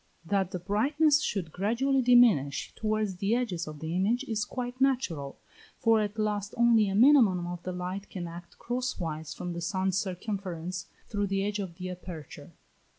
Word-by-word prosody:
That 195 0 +1
the 185 - -4
brightness 285 - +2
should 185 - -2
gradually 240 - +1
diminish 235 - +4
towards 215 -3 -1
the 200 +4 +1
edges 190 -10 -2
of 155 -1 -7
the 160 +2 -3
image 220 +8 +1
is 220 -5 -2
quite 250 0 -5
natural, 175 - 0 0.4
for 225 -1 +3
at 210 +1 -3
last 210 -1 -1
only 230 -3 +5
a 195 - -1
minimum 225 -7 +5
of 175 0 -5
the 185 - -4
light 185 +2 -5
can 175 -3 -5
act 170 +1 -10
cross 250 +1 -3
wise 160 -3 -4
from 175 -1 -5
the 170 - -5
sun's 190 +1 0
circumference 185 -3 -4 0.2
through 205 -2 -1
the 195 0 0
edge 205 0 -2
of 185 -4 -5
the 185 +1 -6
aperture. 175 -5 -9
195 Hz, 175 wpm, -29 LUFS, 180-230 Hz, 0.4 s, only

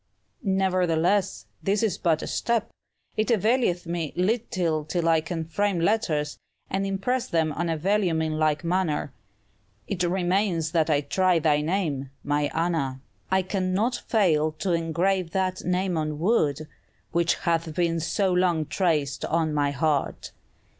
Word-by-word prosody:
"Nevertheless, 185 - +1 0.2
this 205 +2 +1
is 220 - 0
but 165 -3 +1
a - - -3
step; 230 -2 -1 0.5
it 215 +2 +1
availeth 220 -5 +2
me 170 -3 -3
little 185 -5 0
till 165 +2 -1
I 165 -1 +4
can 165 0 -4
frame 195 +3 0
letters, 165 -6 0 0.3
and 195 +1 0
impress 215 +6 -1
them 160 -2 +1
on 170 +3 -2
vellum 185 -1 +1
in 155 -1 -1
like 155 -1 +1
manner. 170 -5 -1 0.7
It 190 -3 -3
remains 180 -2 +1
that 165 -2 +2
I 145 -2 +3
try 185 +5 +2
thy 150 -2 +2
name, 150 -5 -1
my 145 0 0
Anna. 160 -6 -1 0.3
I 190 0 +2
cannot 195 +5 0
fail 155 -8 +2
to 175 +3 -2
engrave 170 +2 0
that 185 -1 -1
name 180 0 0
on 155 -1 -2
wood, 155 - +1 0.4
which 170 0 +2
hath 165 -2 -1
been 170 -1 +1
so 185 +3 0
long 175 -3 +2
traced 155 -3 0
on 160 -1 0
my 145 -1 +1
heart!" 145 +1 -1
170 Hz, 145 wpm, -25 LUFS, 155-190 Hz, 0.7 s, I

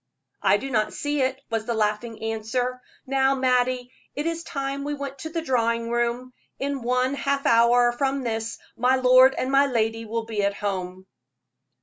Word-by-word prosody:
"I - - +4
do 270 - -6
not 215 -3 0
see 290 -1 -1
it," 260 0 0
was 225 -1 -1
the 235 - -1
laughing 220 +1 -2
answer. 225 +3 -2 0.2
"Now, 270 0 +2
Mattie, 255 -1 +1 0.2
it 290 - -3
is 330 0 -2
time 275 -3 -4
we 290 +1 -3
went 275 -1 -6
to 320 - -5
the 330 0 -3
drawing 230 -4 0
room; 240 +1 -1 0.2
in 280 -1 -3
one 250 +2 +1
half 280 0 -1
hour 240 +1 +5
from 270 +2 -1
this 225 -1 -3 0.2
my 250 +2 +3
lord 255 +1 +6
and 260 - -1
my 275 +1 +5
lady 225 -2 -1
will 225 +1 -3
be 220 -2 -2
at 200 0 0
home." 185 -2 -4
250 Hz, 180 wpm, -24 LUFS, 230-270 Hz, 0.2 s, lord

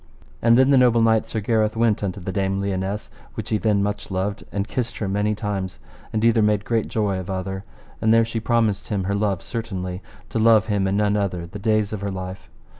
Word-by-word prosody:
And 115 0 +5
then 130 +2 +5
the 135 - +6
noble 120 -2 +5
knight 110 -1 +3
Sir 110 - -3
Gareth 110 0 +1
went 115 -2 +2
unto 100 -1 -2
the 95 +1 -4
Dame 95 0 0
Lionesse, 100 +1 -3 0.2
which - - -5
he 110 - +1
then 105 -2 +2
much 105 +1 -3
loved, 95 +2 -2
and 100 0 -2
kissed 120 -1 -3
her 105 - -2
many 105 +2 0
times, 100 -3 -3 0.3
and 110 +1 0
either 115 -1 +4
made 105 -1 +2
great 115 -2 0
joy 100 -4 0
of 95 - -7
other. 95 +1 -4 0.4
And 110 - +3
there 115 0 +5
she 115 0 -3
promised 115 -3 +1
him 100 -3 -1
her 100 +2 -1
love 100 -2 0
certainly, 95 -6 -4 0.3
to 115 - -1
love 110 -1 +5
him 100 -3 0
and 95 +1 +1
none 105 0 +2
other 90 -4 -1
the 95 +5 -8
days 110 0 +1
of 105 - -4
her 100 - -2
life. 95 0 -6
105 Hz, 225 wpm, -23 LUFS, 95-110 Hz, 0.4 s, the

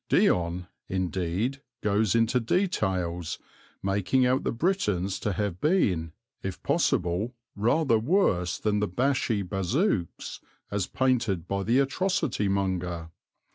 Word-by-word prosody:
Dion, 90 +1 +2 0.2
indeed, 95 +7 -1 0.2
goes 105 -1 +2
into 115 +2 +3
details, 95 - 0 0.5
making 100 +7 +2
out 130 +1 +2
the - - 0
Britons 105 - 0
to 105 - -1
have 100 -3 -2
been, 90 - +2 0.3
if 95 -1 -4
possible, 90 +8 +1 0.2
rather 115 +3 +3
worse 110 - +2
than 105 -1 0
Bashi 110 +1 +1
Bazouks, 95 - -1 0.3
as 100 -2 -1
painted 120 -10 +1
by 100 0 -1
the 115 +6 +2
atrocity 145 - +1
monger. 90 -4 -1
100 Hz, 110 wpm, -27 LUFS, 90-125 Hz, 0.5 s, into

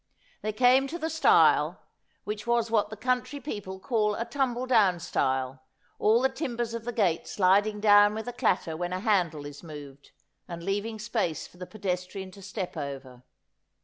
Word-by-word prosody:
They 215 - -2
came 255 +4 +4
to 330 - -5
the 320 -1 -3
stile, 320 - +4 0.4
which 210 +2 -5
was 235 -1 +1
what 210 -2 +2
the 215 - -8
country 250 +4 -1
people 205 -9 -6
call 210 0 0
a 230 - -3
tumble 255 -3 -1
down 210 -8 +3
stile, 130 -4 -1 0.4
all 220 +3 +4
the 265 - +4
timbers 240 -6 -3
of 230 -1 -5
the 240 - -2
gate 195 -8 0
sliding 205 +2 +2
down 205 0 +6
with 220 +2 -5
a 245 - -4
clatter 180 -9 0
when 175 +2 -3
a 185 - -2
handle 180 -8 +1
is 145 0 -9
moved, 145 -4 -11 0.4
and 170 -1 -7
leaving 205 +4 -2
space 215 -7 -2
for - - -17
the 180 0 -8
pedestrian 190 -1 -4
to 195 - -14
step 195 -1 -5
over. 135 -3 -7
205 Hz, 180 wpm, -28 LUFS, 180-235 Hz, 0.4 s, down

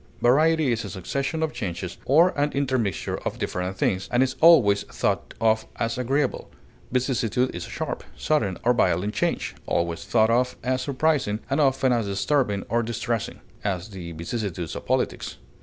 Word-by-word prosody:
Variety 155 +3 +4
is 115 -1 -1
a 100 - -6
succession 140 - -2
of 160 - -1
changes 90 -4 -5
or 160 +7 +5
an 145 -3 0
intermixture 130 -9 -1
of - - -4
different 90 +1 -3
things, 95 0 0
and 120 +1 +4
is 130 0 -1
always 120 -12 +7
thought - - -2
of 110 0 +2
as 115 0 -1
agreeable. 130 +2 -1 0.4
Vicissitude 125 -1 0
is 85 0 -5
sharp, - - -4
sudden, 105 - 0
or 125 - +4
violent 100 -3 +1
change, - - -1
always 85 -1 -1
thought 110 -1 +3
of 125 +2 +2
as 130 0 0
surprising 135 -5 0
and 140 +3 +2
often 135 -2 +3
as 115 -3 0
disturbing 100 +1 0
or 120 +2 +1
distressing; 115 0 -3 0.2
as, 95 0 -2
the 90 -4 -7
vicissitudes 85 0 -4
of - - -7
politics. - - -1
120 Hz, 160 wpm, -25 LUFS, 100-135 Hz, 0.4 s, always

